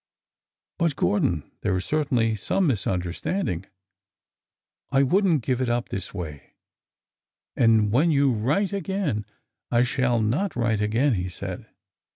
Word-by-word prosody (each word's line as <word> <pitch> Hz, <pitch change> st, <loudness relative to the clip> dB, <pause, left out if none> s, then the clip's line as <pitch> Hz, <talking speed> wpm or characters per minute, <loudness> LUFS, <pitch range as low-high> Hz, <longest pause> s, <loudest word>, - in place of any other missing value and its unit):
But, 165 Hz, -4 st, +1 dB
Gordon, 85 Hz, -, 0 dB
there 100 Hz, -3 st, 0 dB
is 90 Hz, -, -4 dB
certainly 125 Hz, -8 st, +1 dB
some 180 Hz, -, 0 dB
misunderstand 100 Hz, -, -1 dB
ing. 90 Hz, +1 st, -4 dB, 1.2 s
I 135 Hz, 0 st, +3 dB
would 195 Hz, +9 st, +3 dB
n't 155 Hz, -8 st, +2 dB
give 130 Hz, 0 st, 0 dB
it 125 Hz, -, 0 dB
up 120 Hz, 0 st, -1 dB
this 95 Hz, -2 st, -5 dB
way— 80 Hz, -7 st, -8 dB, 1.0 s
and 110 Hz, -3 st, +4 dB
when 145 Hz, +9 st, +3 dB
you 140 Hz, -4 st, +3 dB
write 145 Hz, -, 0 dB
again—" 190 Hz, -, -2 dB, 0.4 s
I 120 Hz, 0 st, +3 dB
shall 125 Hz, -1 st, +1 dB
not 130 Hz, -, 0 dB
write 115 Hz, -3 st, +1 dB
again," 115 Hz, +6 st, +2 dB
he 90 Hz, -3 st, -2 dB
said. 90 Hz, -, -6 dB
120 Hz, 140 wpm, -25 LUFS, 105-145 Hz, 1.2 s, and